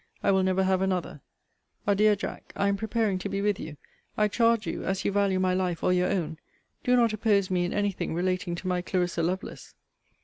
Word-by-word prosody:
I - - +4
will 190 -1 +3
never 190 0 +2
have 190 0 +2
another. 185 -6 -2 0.6
Adieu, 210 +1 +4
Jack, 200 - -7
I 200 - +1
am 200 - +1
preparing 220 -2 0
to 200 - -4
be 195 0 -2
with 205 -1 0
you. 155 -2 -7 0.4
I 210 0 +3
charge 230 0 +2
you, - - -4
as 195 0 -2
you - - +2
value 200 -2 +2
my 185 -1 +2
life 180 -2 -1
or 180 - +3
your 180 0 +2
own, 160 -5 -2 0.4
do 250 - +3
not 235 -3 +3
oppose 205 -3 +1
me 180 -1 +1
in 175 - -3
any 205 -1 +1
thing 175 - -4
relating 180 0 -1
to 185 - -6
my 180 -1 0
Clarissa 180 -1 -1
Lovelace. 185 +4 -4
190 Hz, 215 wpm, -27 LUFS, 180-205 Hz, 0.6 s, I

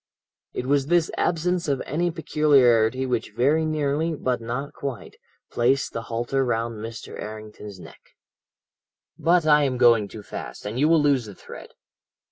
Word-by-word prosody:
"It - - -4
was 140 0 +1
this 170 0 +2
absence 175 +1 0
of 140 -2 0
any 175 +5 0
peculiarity 130 -7 +3
which 120 -4 -2
very 150 +6 +3
nearly, 155 +1 -1
but 125 -4 -2
not 125 +5 -4
quite, 135 -4 -6 0.4
placed 130 +3 +1
the 115 - -3
halter 120 +4 -1
round 115 -2 -2
Mr. 115 +1 -8
Errington's 105 -2 -9
neck. - - -13 1.2
"But 170 0 +3
I 150 -1 +5
am 130 -2 -1
going 115 -4 +5
too 105 +1 -10
fast, - - -8
and 110 +4 -4
you 150 +3 +3
will 165 -2 +4
lose 140 -5 +2
the 100 - -10
thread. - - -11
130 Hz, 155 wpm, -24 LUFS, 115-150 Hz, 1.2 s, I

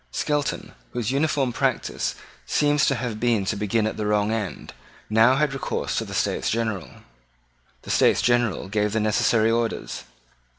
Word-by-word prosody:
Skelton, 145 -2 -2 0.2
whose 120 -1 -1
uniform 140 -3 +1
practice - - -1 0.3
seems 145 0 +2
to 135 - +2
have 120 -3 -4
been 115 -4 +1
to 105 - -1
begin 105 +2 0
at 110 - -2
the 105 -1 -2
wrong 105 0 +1
end, 105 -7 -4 0.4
now 115 +4 +5
had 145 0 +1
recourse 135 - -3
to - - -4
the - - -7
States - - 0
General. 110 -6 -2 0.9
The - - -5
States - - +4
General 120 -6 +1
gave 105 +1 0
the 110 - +1
necessary 110 +1 +2
orders. 115 -1 -2
115 Hz, 160 wpm, -24 LUFS, 105-130 Hz, 0.9 s, now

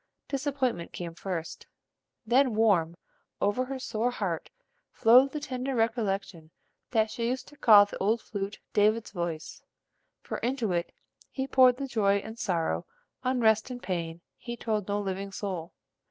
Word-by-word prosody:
Disappointment 270 - -2
came 170 -2 -5
first, 170 -1 -5 0.6
then 250 0 +3
warm 180 -7 +3 0.4
over 205 +6 +1
her 270 +1 -4
sore 235 -2 -1
heart 195 -9 -3 0.4
flowed 255 +4 +6
the 300 - -3
tender 260 -2 -3
recollection 200 -8 -1 0.4
that 220 -2 +2
she 235 -2 -2
used 255 +1 -2
to 295 - -17
call 210 -7 +8
the 205 - -8
old 215 +4 +2
flute 200 -1 -5 0.2
"David's 215 +2 +2
voice," 170 -4 -4 0.6
for - - -5
into 240 -4 -1
it 170 0 -1 0.4
he 265 - -3
poured 255 -2 +5
the 275 - -3
joy 205 -5 +2
and 220 +3 -7
sorrow, 165 - -1 0.4
unrest 235 -3 +2
and 250 -1 -7
pain, 170 -2 -3 0.2
he 240 -1 -7
told 215 -4 -2
no 205 0 0
living 195 0 -3
soul. 185 -4 -4
215 Hz, 150 wpm, -28 LUFS, 190-250 Hz, 0.6 s, call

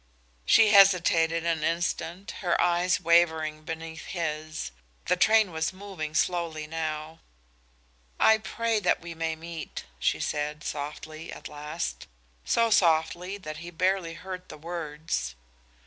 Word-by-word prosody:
She 225 -1 +7
hesitated 175 -5 +5
an 165 -2 0
instant, 170 +2 -2
her 175 -3 +1
eyes 175 +1 +3
wavering 160 -3 +3
beneath 160 +1 -7
his. 155 - -3 0.3
The - - +3
train 215 +1 +4
was 160 -1 -1
moving 185 -6 -6
slowly 170 -3 0
now. 155 0 -4 1.0
"I 220 0 +6
pray 230 0 -1
that 180 -3 +2
we 170 0 -7
may 160 0 -2
meet," 165 0 -7
she - - +1
said, 150 0 -2
softly, 155 +2 -6
at - - -8
last, 150 +3 -5 0.4
so 230 -1 +2
softly 175 +1 +2
that 155 -6 -7
he 170 +2 -8
barely 180 0 0
heard 185 +1 -8
the - - -9
words. 155 - -4
165 Hz, 130 wpm, -28 LUFS, 155-180 Hz, 1.0 s, She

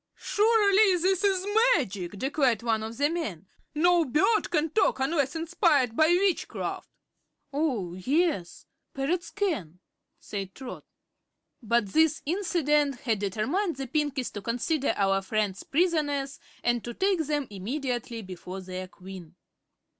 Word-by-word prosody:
"Surely 415 -3 +4
this 375 +2 +1
is 385 -2 +2 0.3
magic!" 195 - -4
declared 260 -2 +1
one 225 -2 +1
of 225 +1 -6
the 285 - +3
men. 295 - -4 0.3
"No 345 +2 +4
bird 310 - +2
can 320 -1 0
talk 405 -7 +2
unless 280 +1 0
inspired 300 -7 +2
by 315 +3 +5
witchcraft." 360 +2 0 0.6
"Oh, 255 - -1
yes; 260 - -1 0.3
parrots 335 +6 -1
can," 300 - -2 0.4
said 195 -2 -6
Trot. 260 -2 -8 0.8
But 235 -2 +1
this 315 +6 +2
incident 300 -6 +1
had 225 -5 0
determined 260 - -1
the 270 0 -5
Pinkies 285 -1 -1
to 205 - -5
consider 255 +7 -1
our 195 -1 +2
friends 200 -1 -1
prisoners 290 -4 0 0.2
and 240 -1 +1
to 240 -1 -6
take 385 -2 +1
them 295 -2 0
immediately 235 +2 -4
before 185 0 -8
their 185 0 -6
Queen. 180 -2 -11
275 Hz, 130 wpm, -27 LUFS, 215-335 Hz, 0.8 s, by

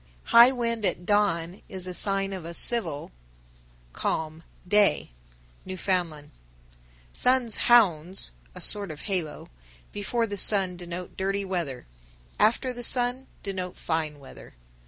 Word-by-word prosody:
985. - - -10 0.2
High - - +2
wind 230 -3 -2
at 175 - -1
dawn 185 -3 0
is 190 -2 +4
a 180 - -4
sign 195 +1 +3
of 185 -3 -6
a 170 +1 -8
"civil" 165 - 0 0.8
(calm) 160 0 -3 0.3
day. 205 - +3 0.5
Newfoundland. 180 -5 -2 0.8
986. - - 0
Sun's 250 -3 +3
"hounds" 185 - +3 0.2
(a - - -7
sort 205 -2 -1
of 155 -1 -8
halo) 180 -7 -3 0.4
before 230 +3 -1
the 205 -2 -5
sun 190 -2 +3
denote 175 0 -7
dirty 195 +1 -2
weather; 170 -9 -4 0.5
after 235 +4 +2
the 245 - -7
sun, 245 +2 0 0.2
denote 185 -3 -5
fine 160 -2 -2
weather. 135 - -14
190 Hz, 135 wpm, -26 LUFS, 170-210 Hz, 0.8 s, is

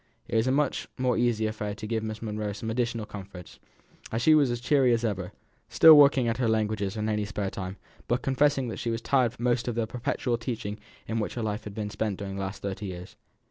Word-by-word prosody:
It - - -4
was 110 +2 +3
a - - +3
much 140 0 0
more 125 -2 +1
easy 115 -2 +1
affair 105 -1 -3
to 105 +1 -7
give 110 0 -1
Miss 110 0 -5
Monro 105 -1 -3
some 110 +2 -4
additional 115 -2 -1
comforts; 95 -3 -10 0.6
she 155 +7 +5
was 145 -4 +5
as 120 0 -2
cheerful 130 0 +3
as 115 0 +1
ever; 95 -5 -2 0.4
still 160 - +8
working 140 -3 +6
away - - +1
at 115 - -3
her 125 -2 +1
languages 110 -2 0
in 105 0 -1
any 105 -1 0
spare 100 -1 -3
time, 95 0 -6 0.3
but 120 +2 0
confessing 135 0 +2
that - - -5
she 120 - -2
was 115 0 -2
tired 125 -4 +2
of 120 -1 0
the 115 -1 0
perpetual 125 0 -2
teaching 110 -3 -4 0.3
in 115 0 -1
which 105 - -3
her 120 - -3
life 105 +1 -3
had 105 -1 -7
been 105 -1 -4
spent 105 -1 -2
during 100 -1 -5
the - - -3
last 95 +1 -5
thirty 100 +1 -4
years. 90 -1 -8
110 Hz, 230 wpm, -27 LUFS, 105-120 Hz, 0.6 s, still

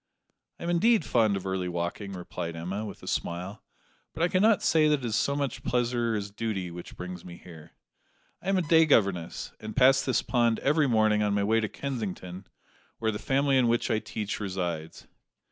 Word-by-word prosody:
"I - - -8
am 170 - -1
indeed 215 +2 +3
fond 110 -4 +2
of 95 - -7
early 95 -1 -2
walking," 85 +3 -4
replied 85 -2 -5
Emma, 90 +6 -4
with - - -9
a - - -10
smile; 90 +5 -3 0.5
"but 165 - -1
I 175 - +3
cannot 205 +3 +3
say 155 -1 +4
that 150 -2 +2
it - - -5
is 110 -2 -1
so 140 +4 +1
much 140 -3 -2
pleasure 120 -2 0
as 100 -1 -4
duty 100 -4 -3
which 85 0 -10
brings 90 -1 -7
me 85 -1 -10
here. 85 -3 -14 0.7
I 190 - -4
am 195 - +3
a 185 - +1
day 160 +1 +5
governess, 95 - +1
and 110 0 -7
pass 135 +1 +5
this 130 - 0
pond 120 -3 +2
every 150 +1 +3
morning 110 -3 +3
on 105 -1 +1
my 100 - +1
way 110 +2 +3
to 110 -2 -2
Kensington, 100 -8 -5 0.5
where 110 -1 0
the 105 - -5
family 135 0 +2
in 125 - +3
which 115 0 +1
I 110 - +2
teach 105 -1 -4
resides." 90 -5 -4
110 Hz, 200 wpm, -28 LUFS, 95-135 Hz, 0.7 s, day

